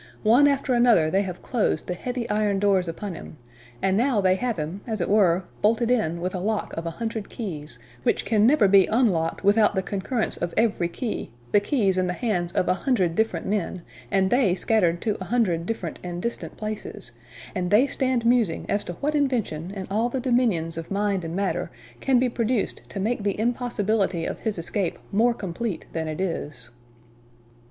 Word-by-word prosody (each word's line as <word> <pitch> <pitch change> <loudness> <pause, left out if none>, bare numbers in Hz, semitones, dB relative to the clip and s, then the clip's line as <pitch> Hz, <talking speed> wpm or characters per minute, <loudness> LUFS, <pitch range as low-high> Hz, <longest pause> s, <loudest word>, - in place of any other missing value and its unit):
One 240 +7 +6
after 275 -2 +1
another 235 -10 +4
they 195 - +3
have 185 -3 -6
closed 240 -5 0
the 180 - -1
heavy 245 +5 -4
iron 210 -2 +1
doors 195 -2 +2
upon 185 +4 -5
him; 160 - -10 0.5
and 190 0 +3
now 240 +1 +2
they 185 -2 +4
have 235 +3 -1
him, 160 +6 -4
as 220 -2 -2
it 175 - 0
were, 190 -3 +3 0.2
bolted 230 +3 +2
in 170 -9 +1
with 180 +1 -2
a 185 - -2
lock 210 +3 -2
of 165 +1 -4
a 165 - -6
hundred 225 -3 -4
keys, 155 - -6 0.2
which - - +1
can 215 -1 +4
never 250 -6 +5
be 195 -1 +6
unlocked 195 -10 +1
without 205 +1 +4
the 190 - 0
concurrence 215 +5 -2
of 170 - -3
every 215 -6 +2
key 220 +7 -4 0.2
the 205 - +6
keys 200 -4 +1
in 185 - +1
the 180 - -1
hands 180 -5 -1
of 180 - +1
a - - +4
hundred 185 -6 +1
different 220 +5 0
men, 190 -3 -2 0.3
and 190 -1 +2
they 240 -8 +3
scattered 175 -3 +2
to 215 -3 -1
a - - -4
hundred 185 -8 0
different 190 -8 -4
and 175 -1 -5
distant 235 +6 -4
places; 215 -1 -5 0.4
and 180 -2 -2
they 215 +7 +5
stand 255 -4 0
musing 235 -8 +2
as 205 - 0
to 175 - -5
what 290 - -2
invention, 240 - 0
in 195 -1 -6
all 225 +4 +1
the 265 - -2
dominions 225 -11 +1
of 165 - -8
mind 200 -2 0
and 165 +1 -4
matter, 195 0 -1 0.3
can 265 -2 +3
be 250 +1 +3
produced 235 -2 -1
to 200 - -5
make 220 +4 -1
the 200 0 -1
impossibility 220 -6 0
of - - -4
his 220 -4 -2
escape 170 +2 -2
more 235 +4 +3
complete 195 +1 -4
than 160 -1 -2
it 155 +1 -4
is." 165 -5 -4
205 Hz, 195 wpm, -25 LUFS, 180-235 Hz, 0.5 s, One